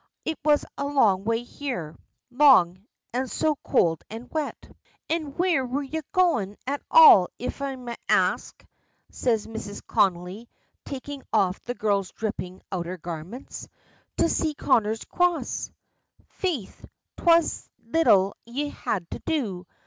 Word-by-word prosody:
"It 320 - -2
was 295 -1 +3
a 280 - -1
long 210 -9 +3
way 230 +1 0
here 240 - -5 0.4
long, 225 -9 +5 0.3
and 255 +1 -1
so 310 -1 +1
cold 165 -3 +2
and 225 +3 -9
wet." 310 -2 -4 0.4
"An' 315 -4 -1
where 350 -6 +2
were 260 +3 -2
ye 315 +4 -4
goin' 240 - +1
at 280 +2 -2
all, 450 - +9
if 250 - -5
I 275 -1 -2
may 245 -2 -7
ax?" - - +2 0.6
says 225 -4 0
Mrs. 220 -2 -7
Connolly, 195 +2 0 0.4
taking 280 +1 -6
off 195 -4 +1
the 245 - -5
girl's 200 -4 0
dripping 185 -4 -5
outer 180 -1 -3
garments. 175 - -8 0.5
"To - - +3
see 310 -2 0
Connor's 225 -6 +1
Cross 355 -1 0 0.3
" - - -50 0.3
"Faith, 330 - -4 0.3
'twas 335 -1 +3 0.2
little 210 -8 +3
ye 280 +5 -3
had 185 -10 -3
to - - -5
do! 200 - -3
240 Hz, 135 wpm, -25 LUFS, 195-290 Hz, 0.6 s, all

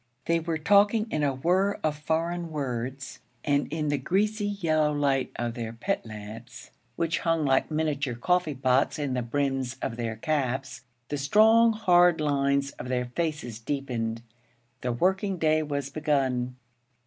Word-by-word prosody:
They 170 0 +2
were 165 0 -2
talking 205 +6 +4
in 155 - 0
a 140 -2 +1
whirr 185 +8 +1
of 155 -1 +1
foreign 165 +3 -2
words; 130 -2 -4 0.3
and 145 -1 +1
in 155 -1 -1
the 145 -1 0
greasy 205 - 0
yellow 160 -7 +1
light 140 -3 0
of 120 -1 -2
their 115 -1 -5
pit 190 +13 -2
lamps, 110 +3 -10 0.2
which 165 0 0
hung 165 -2 +1
like 135 -1 +2
miniature 150 -5 -1
coffee 165 +4 +1
pots 130 +1 +2
in 145 -3 -2
the 125 - 0
brims 135 0 -1
of 115 - -4
their 115 -2 -3
caps, 130 0 -2 0.3
the 145 - -2
strong, 220 +9 +5
hard 175 -5 +4
lines 140 -2 +1
of 125 - -6
their 125 -1 -1
faces 125 -4 -3
deepened. 115 -3 -3 0.6
The 125 - -1
working 190 - +1
day 155 -1 +2
was 140 -2 -3
begun. 130 -5 0
145 Hz, 155 wpm, -27 LUFS, 130-165 Hz, 0.6 s, strong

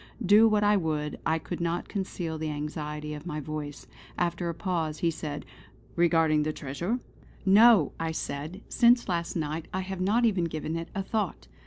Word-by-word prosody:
Do 210 +4 +7
what 210 -1 +3
I 205 0 +5
would, 155 -4 -2
I 160 0 +2
could 170 +2 -6
not 170 +1 -1
conceal 175 -5 -4
the 155 0 -2
anxiety 150 0 -4
of 150 +3 -8
my 155 -3 -3
voice. 150 0 -6 0.3
After 175 0 -1
a - - -2
pause 165 -3 -2
he 170 +1 +1
said: 150 -2 -5 0.5
"Regarding 165 -3 +3
the 155 +1 0
treasure?" 170 - -3 0.5
"No!" 205 - +7 0.2
said 155 +4 -5
I: - - -26
"Since 240 0 +4
last 170 -2 -2
night 155 0 -3
I 190 - -1
have 190 0 -5
not 220 +6 +3
even 190 -6 +2
given 160 0 -3
it 165 0 -4
a 195 - -1
thought." 210 -3 -2
170 Hz, 180 wpm, -28 LUFS, 155-190 Hz, 0.5 s, Do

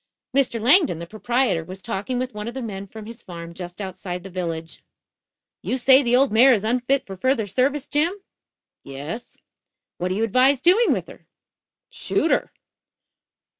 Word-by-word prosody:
Mr. 265 -4 +2
Langdon, 270 - +4
the 170 - -6
proprietor, 220 -2 0
was 185 +3 -9
talking 230 +2 -3
with 255 +1 -3
one 210 +1 -6
of 240 - -6
the 265 - -4
men 200 -3 -6
from 220 +2 -10
his 230 +2 -10
farm 170 -1 -9
just 175 +1 -9
outside 180 -2 -5
the 195 - -9
village. 165 -3 -5 0.8
"You 260 - -2
say 265 +2 +6
the 245 -2 +2
old 270 0 +4
mare 245 +4 +6
is 205 - -3
unfit 250 +4 +1
for 195 - -8
further 245 +2 +1
service, 265 +7 0
Jim?" 320 +6 +1 0.7
"Yes." 145 - -8 0.6
"What 180 - -1
do 185 - -1
you 220 - 0
advise 255 +5 +3
doing 370 - +4
with - - -1
her?" - - -15 0.6
"Shoot - - -1
her." - - +1
225 Hz, 170 wpm, -23 LUFS, 185-260 Hz, 0.8 s, say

